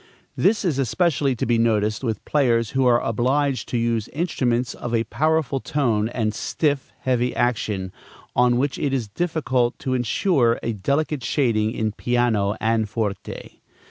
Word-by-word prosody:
This 210 Hz, 0 st, +2 dB
is 150 Hz, -6 st, 0 dB
especially 140 Hz, 0 st, +1 dB
to -, -, -2 dB
be 115 Hz, 0 st, +2 dB
noticed 110 Hz, 0 st, +1 dB
with 110 Hz, -5 st, -3 dB
players 115 Hz, -6 st, +2 dB
who 130 Hz, -1 st, +2 dB
are 120 Hz, -1 st, +5 dB
obliged 130 Hz, +2 st, 0 dB
to 120 Hz, -, -1 dB
use 115 Hz, -2 st, 0 dB
instruments 130 Hz, -6 st, -1 dB
of 120 Hz, -1 st, -3 dB
a 115 Hz, -, +2 dB
powerful 155 Hz, +2 st, 0 dB
tone 115 Hz, -7 st, 0 dB
and 110 Hz, -3 st, -1 dB
stiff, 145 Hz, +4 st, -1 dB
heavy 125 Hz, -1 st, 0 dB
action, 105 Hz, -6 st, -1 dB, 0.4 s
on 120 Hz, 0 st, +4 dB
which 140 Hz, +2 st, -1 dB
it 140 Hz, -2 st, -1 dB
is 120 Hz, -5 st, -2 dB
difficult 130 Hz, -, 0 dB
to 130 Hz, -, -3 dB
insure 125 Hz, -, +2 dB
a 115 Hz, -, -1 dB
delicate 140 Hz, +6 st, -1 dB
shading 115 Hz, -5 st, +1 dB
in 110 Hz, -2 st, -1 dB
piano 110 Hz, -3 st, +1 dB
and 110 Hz, -1 st, +1 dB
forte. 105 Hz, -2 st, -5 dB
120 Hz, 155 wpm, -23 LUFS, 110-140 Hz, 0.4 s, are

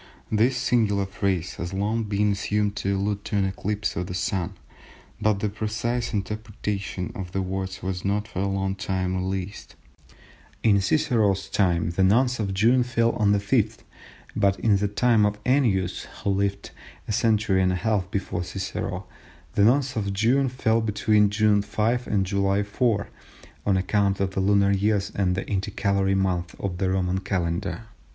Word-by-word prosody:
This 115 Hz, +4 st, +3 dB
singular 105 Hz, -5 st, +1 dB
phrase 95 Hz, -3 st, -2 dB
has 85 Hz, +3 st, -4 dB
long 105 Hz, +4 st, 0 dB
been 105 Hz, 0 st, +1 dB
assumed 105 Hz, +1 st, 0 dB
to 100 Hz, 0 st, 0 dB
allude 100 Hz, +1 st, -2 dB
to 105 Hz, -, -3 dB
an 100 Hz, -, +2 dB
eclipse 105 Hz, +2 st, -2 dB
of 90 Hz, +1 st, -3 dB
the 90 Hz, -, -5 dB
Sun, 90 Hz, -1 st, -1 dB, 0.7 s
but 105 Hz, -1 st, +2 dB
the 105 Hz, -, +1 dB
precise 110 Hz, +3 st, -2 dB
interpretation 105 Hz, -3 st, -4 dB
of 90 Hz, -3 st, -7 dB
the 95 Hz, -, 0 dB
words 95 Hz, 0 st, -4 dB
was 95 Hz, -1 st, -3 dB
not 105 Hz, +2 st, 0 dB
for 90 Hz, -, -6 dB
a 100 Hz, -, 0 dB
long 95 Hz, 0 st, -1 dB
time 95 Hz, -2 st, -2 dB
realised. 95 Hz, +2 st, -4 dB, 0.9 s
In 100 Hz, -3 st, +4 dB
Cicero's 105 Hz, -5 st, +1 dB
time 85 Hz, -4 st, +1 dB
the 95 Hz, +3 st, +1 dB
Nones 125 Hz, +6 st, +3 dB
of 100 Hz, -3 st, -1 dB
June 115 Hz, +7 st, +3 dB
fell 115 Hz, -1 st, +1 dB
on 105 Hz, -2 st, +2 dB
the 105 Hz, -, +4 dB
5th, 110 Hz, +1 st, 0 dB, 0.5 s
but 100 Hz, -2 st, +2 dB
in 105 Hz, -3 st, +4 dB
the 100 Hz, +1 st, 0 dB
time 110 Hz, +2 st, +3 dB
of 105 Hz, 0 st, +1 dB
Ennius, 110 Hz, -9 st, +1 dB, 0.2 s
who 100 Hz, -, +1 dB
lived 100 Hz, 0 st, -1 dB, 0.4 s
a -, -, -3 dB
century 105 Hz, -3 st, +2 dB
and 90 Hz, 0 st, +3 dB
a -, -, 0 dB
half 100 Hz, -2 st, 0 dB
before 95 Hz, -1 st, -2 dB
Cicero, 95 Hz, +2 st, -4 dB, 0.5 s
the 100 Hz, -, +3 dB
Nones 125 Hz, +3 st, +3 dB
of 100 Hz, -3 st, -1 dB
June 125 Hz, +7 st, +2 dB
fell 115 Hz, -2 st, +1 dB
between 105 Hz, -1 st, +2 dB
June 105 Hz, 0 st, +3 dB
5 110 Hz, +4 st, -1 dB
and 100 Hz, -2 st, +1 dB
July 100 Hz, +1 st, +1 dB
4 105 Hz, 0 st, 0 dB, 0.6 s
on 100 Hz, -2 st, +3 dB
account 100 Hz, +1 st, +1 dB
of 95 Hz, -1 st, 0 dB
the 95 Hz, -, -3 dB
lunar 100 Hz, 0 st, +3 dB
years 100 Hz, +1 st, +1 dB
and 95 Hz, -2 st, +1 dB
the 95 Hz, -, -4 dB
intercalary 100 Hz, -1 st, 0 dB
month 90 Hz, -3 st, -1 dB
of 90 Hz, -3 st, -3 dB
the 95 Hz, -1 st, +1 dB
Roman 95 Hz, 0 st, 0 dB
Calendar. 90 Hz, +1 st, -2 dB
100 Hz, 170 wpm, -25 LUFS, 95-110 Hz, 0.9 s, In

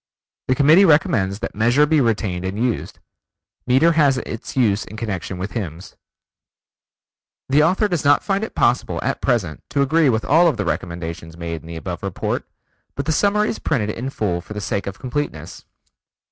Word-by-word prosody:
The 130 Hz, -, +2 dB
Committee 155 Hz, +7 st, +6 dB
recommends 125 Hz, -, +3 dB
that -, -, -4 dB
Measure 120 Hz, +7 st, +3 dB
be 155 Hz, -1 st, +3 dB
retained 100 Hz, -6 st, -1 dB
and 95 Hz, +2 st, -3 dB
used. 120 Hz, 0 st, -2 dB, 0.7 s
Meter 135 Hz, +7 st, +4 dB
has 145 Hz, -5 st, +3 dB
its 115 Hz, 0 st, -6 dB
use 105 Hz, -5 st, +2 dB
in 110 Hz, -, -10 dB
connection 100 Hz, -4 st, -4 dB
with 95 Hz, +2 st, -5 dB
hymns. 90 Hz, -5 st, -6 dB, 1.5 s
The 140 Hz, +3 st, +4 dB
author 185 Hz, +7 st, +3 dB
does 175 Hz, -5 st, -2 dB
not 145 Hz, 0 st, +4 dB
find 200 Hz, +1 st, 0 dB
it 220 Hz, -, -6 dB
possible 120 Hz, +1 st, +1 dB
at -, -, -2 dB
present 95 Hz, -, 0 dB
to 140 Hz, 0 st, +1 dB
agree 155 Hz, +1 st, +3 dB
with 110 Hz, -2 st, 0 dB
all 165 Hz, +4 st, +5 dB
the -, -, -3 dB
recommendations 85 Hz, -1 st, -4 dB
made 85 Hz, -1 st, -5 dB
in -, -, -14 dB
the 85 Hz, -, -7 dB
above 85 Hz, +2 st, -5 dB
report, 100 Hz, -2 st, -3 dB, 0.5 s
but 140 Hz, -, -3 dB
the 160 Hz, -, 0 dB
summary 210 Hz, +6 st, +2 dB
is -, -, -4 dB
printed 110 Hz, -9 st, -1 dB
in 125 Hz, +5 st, -5 dB
full 95 Hz, -9 st, -2 dB
for 105 Hz, -, -10 dB
the -, -, -3 dB
sake 100 Hz, 0 st, -3 dB
of 100 Hz, 0 st, -5 dB
completeness. 130 Hz, -, -5 dB
120 Hz, 180 wpm, -21 LUFS, 95-150 Hz, 1.5 s, Committee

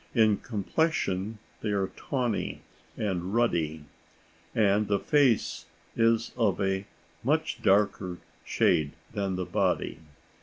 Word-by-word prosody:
In 110 Hz, -3 st, +5 dB
complexion 110 Hz, -, -1 dB, 0.2 s
they 110 Hz, -, -2 dB
are 100 Hz, -2 st, 0 dB
tawny 125 Hz, -6 st, -2 dB, 0.3 s
and 95 Hz, -1 st, -2 dB
ruddy, 80 Hz, -10 st, +1 dB, 0.7 s
and 105 Hz, -1 st, +3 dB
the 100 Hz, -, +2 dB
face 130 Hz, -1 st, +2 dB, 0.3 s
is 115 Hz, 0 st, +2 dB
of 110 Hz, -6 st, +1 dB
a 95 Hz, 0 st, 0 dB, 0.4 s
much -, -, 0 dB
darker 95 Hz, -2 st, +2 dB, 0.3 s
shade 75 Hz, -2 st, +2 dB, 0.2 s
than 100 Hz, -2 st, -1 dB
the 90 Hz, 0 st, -2 dB
body. -, -, 0 dB
100 Hz, 110 wpm, -28 LUFS, 95-115 Hz, 0.7 s, In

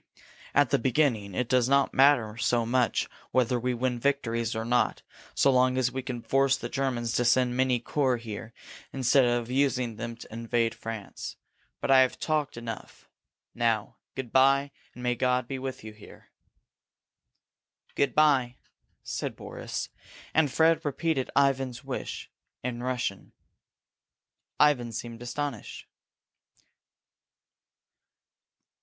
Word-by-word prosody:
At -, -, +4 dB
the -, -, +3 dB
beginning 115 Hz, -6 st, +1 dB
it 125 Hz, -, -1 dB
does 125 Hz, 0 st, +2 dB
not 140 Hz, 0 st, +3 dB
matter 130 Hz, -6 st, +4 dB
so 120 Hz, 0 st, +1 dB
much 120 Hz, -2 st, +1 dB, 0.2 s
whether 125 Hz, -1 st, +1 dB
we 125 Hz, +1 st, -1 dB
win 125 Hz, 0 st, -1 dB
victories 115 Hz, -4 st, 0 dB
or 110 Hz, 0 st, -3 dB
not, 120 Hz, +1 st, +1 dB, 0.3 s
so 140 Hz, -, +4 dB
long 130 Hz, 0 st, +3 dB
as 125 Hz, -1 st, +1 dB
we 130 Hz, +1 st, -3 dB
can 125 Hz, -2 st, -6 dB
force 135 Hz, 0 st, +2 dB
the 120 Hz, -, -6 dB
Germans 125 Hz, -4 st, -1 dB
to 120 Hz, -, +1 dB
send 125 Hz, +1 st, +3 dB
many 130 Hz, -1 st, +2 dB
corps 130 Hz, +1 st, 0 dB
here 115 Hz, -1 st, -7 dB, 0.4 s
instead 130 Hz, 0 st, +3 dB
of 120 Hz, 0 st, 0 dB
using 130 Hz, -4 st, +1 dB
them 115 Hz, 0 st, -5 dB
to 115 Hz, -, -12 dB
invade 115 Hz, 0 st, 0 dB
France. 110 Hz, -3 st, -7 dB, 0.4 s
But -, -, -1 dB
I 135 Hz, -, +8 dB
have 130 Hz, -1 st, +3 dB
talked 150 Hz, -4 st, -1 dB
enough. 115 Hz, -1 st, -8 dB, 0.4 s
Now 115 Hz, -3 st, 0 dB, 0.2 s
good 130 Hz, -4 st, -5 dB
bye, 135 Hz, +1 st, +4 dB, 0.2 s
and 125 Hz, -, -9 dB
may 125 Hz, 0 st, +2 dB
God 125 Hz, 0 st, 0 dB
be 135 Hz, 0 st, -4 dB
with 130 Hz, -2 st, -6 dB
you 110 Hz, 0 st, -8 dB
here!" 105 Hz, -, -16 dB, 1.6 s
"Good 140 Hz, -4 st, 0 dB
bye," 135 Hz, -5 st, +3 dB, 0.5 s
said -, -, -4 dB
Boris, -, -, -6 dB, 0.4 s
and 155 Hz, -3 st, +3 dB
Fred 160 Hz, +2 st, +3 dB
repeated 145 Hz, -1 st, -1 dB
Ivan's 135 Hz, -3 st, +1 dB
wish -, -, -6 dB, 0.3 s
in 120 Hz, -1 st, -3 dB
Russian. 125 Hz, -6 st, -3 dB, 1.3 s
Ivan 125 Hz, -6 st, +3 dB
seemed 115 Hz, +1 st, -6 dB
astonished. 125 Hz, -1 st, -5 dB
125 Hz, 135 wpm, -28 LUFS, 115-135 Hz, 1.6 s, I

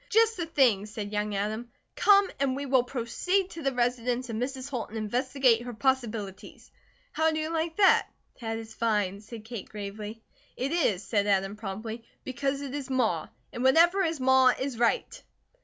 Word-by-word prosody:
"Just 450 Hz, +1 st, +4 dB
the 340 Hz, -4 st, -3 dB
thing!" 245 Hz, -11 st, +3 dB
said 210 Hz, -1 st, -6 dB
young 210 Hz, 0 st, -1 dB
Adam. 215 Hz, +4 st, -3 dB, 0.3 s
"Come 400 Hz, -1 st, +5 dB
and 270 Hz, -2 st, +1 dB
we 280 Hz, +1 st, -4 dB
will 260 Hz, -2 st, +4 dB
proceed 275 Hz, +11 st, -1 dB
to 330 Hz, -, -7 dB
the 275 Hz, -2 st, +1 dB
residence 245 Hz, 0 st, -1 dB
of -, -, -4 dB
Mrs. 260 Hz, +3 st, -3 dB
Holt 250 Hz, -5 st, -4 dB
and 220 Hz, -, -7 dB
investigate 245 Hz, +2 st, +2 dB
her 245 Hz, -1 st, -7 dB
possibilities. 225 Hz, -6 st, -2 dB, 0.4 s
How 320 Hz, 0 st, +2 dB
do 315 Hz, -, -1 dB
you 315 Hz, +1 st, -3 dB
like 325 Hz, 0 st, -2 dB
that?" 395 Hz, -2 st, +5 dB, 0.3 s
"That 225 Hz, -2 st, -3 dB
is 225 Hz, 0 st, -8 dB
fine," 210 Hz, -4 st, 0 dB
said 220 Hz, 0 st, -10 dB
Kate 230 Hz, -3 st, -7 dB
gravely. 210 Hz, +2 st, -7 dB, 0.3 s
"It 270 Hz, +3 st, -2 dB
is," 225 Hz, -, +1 dB
said 205 Hz, -2 st, 0 dB
Adam, 195 Hz, 0 st, +1 dB
promptly, 220 Hz, +2 st, -6 dB, 0.2 s
"because 275 Hz, +2 st, -2 dB
it 280 Hz, -2 st, -6 dB
is 285 Hz, -2 st, -5 dB
Ma. 225 Hz, -12 st, 0 dB, 0.3 s
And 245 Hz, -, -4 dB
whatever 335 Hz, +8 st, +5 dB
is 330 Hz, -4 st, 0 dB
Ma, 260 Hz, 0 st, +5 dB
is 265 Hz, -3 st, -3 dB
right." 235 Hz, -1 st, 0 dB
245 Hz, 180 wpm, -28 LUFS, 215-275 Hz, 0.4 s, Come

